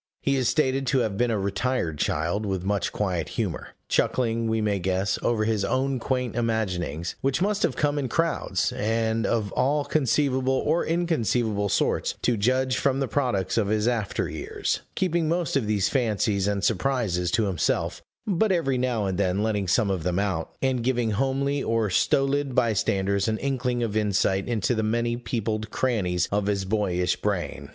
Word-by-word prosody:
He 140 - +2
is 130 -2 +1
stated 135 -2 +1
to 135 0 +3
have 110 -4 -1
been 120 +4 +1
a 110 - +1
retired 100 - -1
child, 85 +8 0
with 95 -3 -2
much 100 +1 0
quiet 90 -6 -2
humor; - - -3
chuckling, 115 -2 +1
we 110 0 +1
may 105 -2 0
guess, 95 +1 0
over 110 -2 +1
his 110 -2 0
own 130 +5 0
quaint 125 -1 -2
imaginings, 90 -8 -1
which 135 +1 +1
must 205 +2 0
have - - +1
come 145 -1 +1
in 135 -3 -2
crowds, 165 +6 0
and 110 +1 0
of 110 -4 0
all 140 +3 +1
conceivable 135 -2 +1
or 155 +5 +1
inconceivable 120 - 0
sorts, - - 0
to 120 - +3
judge 130 +4 +1
from 135 -1 +1
the 135 - 0
products 115 -8 0
of 105 - +1
his 105 +1 +1
after 115 -5 -1
years; - - -3 0.2
keeping 170 -4 +1
most 170 -3 0
of 130 -6 +1
these 105 -2 +2
fancies 105 -6 +1
and 100 -1 -1
surprises 105 -6 0
to 110 +5 +1
himself, 95 -5 -1 0.2
but 205 +1 +1
every 135 -8 +1
now 125 -4 0
and 95 -1 -2
then 95 +1 +1
letting 105 -3 0
some 100 +2 +2
of 95 -3 -1
them 90 +2 -1
out, 95 -5 -2
and 130 -3 +1
giving 120 -3 +1
homely 135 +5 0
or 115 -4 0
stolid 135 +5 +1
bystanders 100 -2 +1
an 110 0 0
inkling 125 -2 -1
of 110 -2 -2
insight 100 -2 +1
into 120 +1 0
the 110 - 0
many 120 +2 0
peopled 110 -3 -3
crannies 95 -9 0
of 100 0 0
his 100 -2 0
boyish 95 -3 0
brain. 90 -8 -3
115 Hz, 175 wpm, -25 LUFS, 100-130 Hz, 0.2 s, to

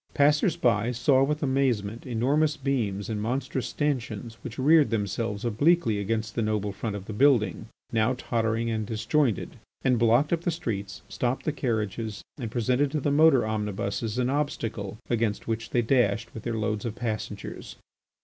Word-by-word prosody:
Passers 150 +4 +3
by 115 0 +2
saw 130 +3 +3
with 150 +2 -1
amazement 125 -5 0
enormous 140 +6 +1
beams 115 -8 -1
and 110 -2 -3
monstrous 130 +3 -2
stanchions 120 -6 -3
which 120 -2 -7
reared 150 +3 +5
themselves 105 0 -2
obliquely 120 0 +2
against 110 +2 -2
the 115 - -1
noble 105 -2 0
front 105 +1 -4
of 100 -2 -6
the 110 - -6
building, 110 - +3 0.2
now 115 +3 +2
tottering 115 -1 -1
and 110 -2 -2
disjointed, 115 +1 0 0.3
and 125 -3 +3
blocked 120 +7 +3
up 165 - 0
the 175 - -1
streets, 105 - -4
stopped 125 +1 -2
the 155 - +1
carriages, 110 -5 -2 0.2
and 120 -3 -3
presented 125 +5 +1
to 150 +2 -1
the 145 +1 0
motor 145 -4 +5
omnibuses 105 +1 -2
an 125 0 +1
obstacle 115 -8 -2
against 115 -3 -1
which 115 0 -2
they 120 - +1
dashed 115 -2 +1
with 110 - -7
their 115 0 -3
loads 105 -1 -1
of 115 -2 -4
passengers. 115 -3 -5
115 Hz, 165 wpm, -27 LUFS, 110-135 Hz, 0.3 s, reared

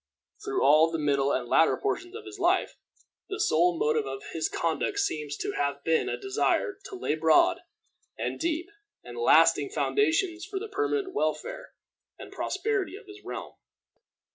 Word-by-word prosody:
Through 405 -2 -1
all 155 +2 +6
the 165 - -2
middle 140 -2 +1
and 125 -2 -1
latter 160 - +4
portions 390 -2 -3
of 440 -1 -8
his 395 0 -10
life, 365 +1 +1 0.5
the 395 - -4
sole 170 +2 +3
motive 150 -2 +1
of 135 0 -6
his 160 -1 -1
conduct 170 - -1
seems 150 - -2
to - - -3
have 140 0 -2
been 165 -1 +1
a - - -2
desire 395 0 0
to - - -8
lay 365 - -1
broad, 155 0 +4 0.6
and - - -3
deep, 335 +3 -2 0.3
and - - -10
lasting 465 - +4
foundations 350 -3 +1
for 390 +1 -5
the 430 +3 -4
permanent 410 -2 -1
welfare - - -3 0.4
and - - -11
prosperity 390 -1 -2
of 435 +2 -12
his 400 +1 -13
realm. - - -7
355 Hz, 165 wpm, -27 LUFS, -, 0.6 s, all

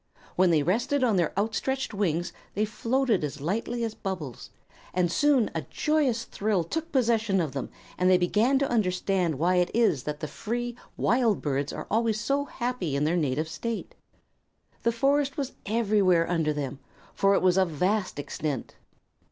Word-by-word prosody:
When 185 0 +4
they 155 -3 +3
rested 245 - +1
on 230 -5 +3
their 170 -3 +2
outstretched 225 +6 -1
wings 175 -4 -1 0.2
they 210 +2 +2
floated 230 - 0
as 145 0 -4
lightly 230 - -2
as 225 -2 -2
bubbles, 175 - -6 0.5
and 180 -2 +2
soon 270 +3 +3
a 160 - -2
joyous 265 - 0
thrill 205 -6 -1
took 325 - -4
possession 225 -6 +2
of 160 -5 -1
them 135 -1 -4 0.3
and 180 0 +4
they 185 - +6
began 210 +9 +2
to 275 0 +1
understand 185 - 0
why 180 +5 +2
it 180 0 +2
is 225 - +3
that 150 0 -3
the 155 - -4
free, 240 +9 -4 0.2
wild 230 -2 +2
birds 140 -1 -1
are - - -6
always 225 -1 +1
so 275 +5 0
happy 240 - -3
in 140 - +1
their 160 +3 +2
native 155 -1 0
state. 230 - -4 0.9
The 235 - +2
forest 280 +5 +1
was 275 -2 -2 0.2
everywhere 200 -6 +3
under 165 -3 +1
them, 140 -2 -4 0.3
for 195 0 +3
it - - +1
was 180 -1 +4
of 185 -2 +2
vast 185 +5 0
extent. 145 -2 -4
200 Hz, 170 wpm, -27 LUFS, 165-235 Hz, 0.9 s, they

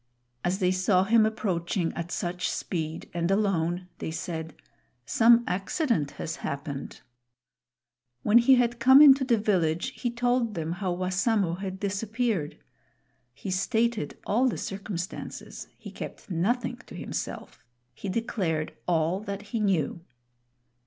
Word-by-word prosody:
As 180 +2 +1
they 185 -2 +2
saw 185 0 +3
him 220 +2 +4
approaching 180 -5 -1
at 170 0 -5
such 180 +1 -2
speed 160 -2 -3
and 170 0 -1
alone, 180 -3 +1
they - - -3
said, 160 -1 -5 0.5
"Some 235 +1 +5
accident 195 - 0
has 165 - -4
happened." 140 0 -5 1.2
When 220 +3 +6
he 260 +3 +6
had 240 -1 +1
come 265 +3 +8
into 275 -2 +8
the 245 -3 +3
village, 180 -3 +1
he 245 - -2
told 240 -2 0
them 165 -1 -3
how 185 +1 -2
Wassamo 185 +1 +1
had 190 -1 -5
disappeared. 205 -3 -1 0.8
He 165 +8 -5
stated 220 -1 0
all 245 +5 +2
the 250 - -1
circumstances. 195 -1 -6
He - - -10
kept - - -8
nothing 235 +8 0
to - - -10
himself. - - -6 0.3
He 200 - -6
declared 185 -7 -1
all 170 +1 +1
that 205 0 -6
he 230 - +1
knew. 180 -5 0
195 Hz, 130 wpm, -27 LUFS, 170-230 Hz, 1.2 s, come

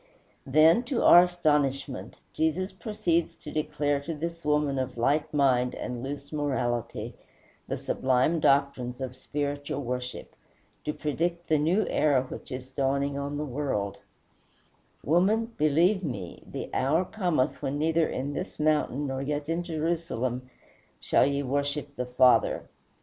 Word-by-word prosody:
Then, 155 - +6
to 240 -1 -1
our 175 +1 +9
astonishment, 145 -6 -1 0.2
Jesus 160 +5 0
proceeds 205 -7 -1
to 150 - -10
declare 145 -2 0
to 155 +3 -5
this 170 +2 -5
woman 150 -2 +1
of 130 -1 -3
light 150 +6 +1
mind 130 -4 +2
and 125 -1 -5
loose 140 +3 -6
morality 130 -5 -2 0.5
the - - -2
sublime 130 +6 +1
doctrines 135 -4 +1
of 130 -1 -5
spiritual 145 +1 -3
worship, 125 0 -5 0.5
to 150 - 0
predict 170 +3 -2
the 155 -2 +4
new 175 +8 +2
era 140 -4 +2
which 130 - -9
is 130 0 -5
dawning 140 +1 0
on 140 +1 -3
the 150 - -2
world: 125 -8 -2 1.0
"Woman, 210 +9 +2
believe 170 +7 +3
me, 100 - -5
the - - -6
hour 155 +8 +2
cometh 175 -11 0
when 135 +2 -2
neither 160 +2 +2
in 140 +3 -3
this - - -5
mountain 150 -2 +1
nor 135 -1 -3
yet 145 +1 -2
in 165 +2 0
Jerusalem 155 -7 -2 0.5
shall - - +3
ye 140 0 0
worship 145 +1 -2
the 125 -1 -3
Father. 125 0 +4
145 Hz, 140 wpm, -28 LUFS, 130-160 Hz, 1.0 s, our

